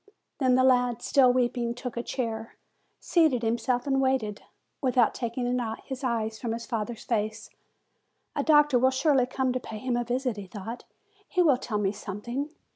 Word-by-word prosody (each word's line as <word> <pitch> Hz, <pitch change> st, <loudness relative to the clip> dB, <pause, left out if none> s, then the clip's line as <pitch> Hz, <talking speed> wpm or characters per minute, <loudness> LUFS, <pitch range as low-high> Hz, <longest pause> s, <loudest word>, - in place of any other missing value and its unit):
Then 255 Hz, -3 st, +4 dB
the 255 Hz, -, +4 dB
lad, 245 Hz, -2 st, +3 dB
still 260 Hz, -3 st, +5 dB
weeping, 240 Hz, -1 st, 0 dB
took 245 Hz, 0 st, -6 dB
a 235 Hz, -, -1 dB
chair, 225 Hz, -3 st, -4 dB, 0.4 s
seated 310 Hz, -9 st, +2 dB
himself 245 Hz, +2 st, 0 dB
and 270 Hz, -1 st, +1 dB
waited, 260 Hz, -6 st, 0 dB, 0.4 s
without 250 Hz, -4 st, +3 dB
taking 240 Hz, +1 st, -3 dB, 0.4 s
his 265 Hz, 0 st, -6 dB
eyes 225 Hz, -3 st, -1 dB
from 230 Hz, -2 st, -2 dB
his 230 Hz, 0 st, -5 dB
father's 230 Hz, 0 st, -4 dB
face. 215 Hz, -1 st, -2 dB, 0.8 s
"A -, -, +1 dB
doctor 295 Hz, -4 st, +5 dB
will 260 Hz, +2 st, +4 dB
surely 265 Hz, -1 st, +2 dB
come 260 Hz, 0 st, -1 dB
to 255 Hz, -, -1 dB
pay 220 Hz, -3 st, -8 dB
him 250 Hz, +2 st, -2 dB
a 240 Hz, -, 0 dB
visit," 245 Hz, -1 st, -1 dB
he 200 Hz, -2 st, -7 dB
thought; 220 Hz, +5 st, -7 dB, 0.4 s
"he 365 Hz, -3 st, +2 dB
will 290 Hz, -6 st, +4 dB
tell 220 Hz, -4 st, -3 dB
me 200 Hz, -2 st, +1 dB
something." 215 Hz, +8 st, -5 dB
245 Hz, 175 wpm, -27 LUFS, 225-260 Hz, 0.8 s, still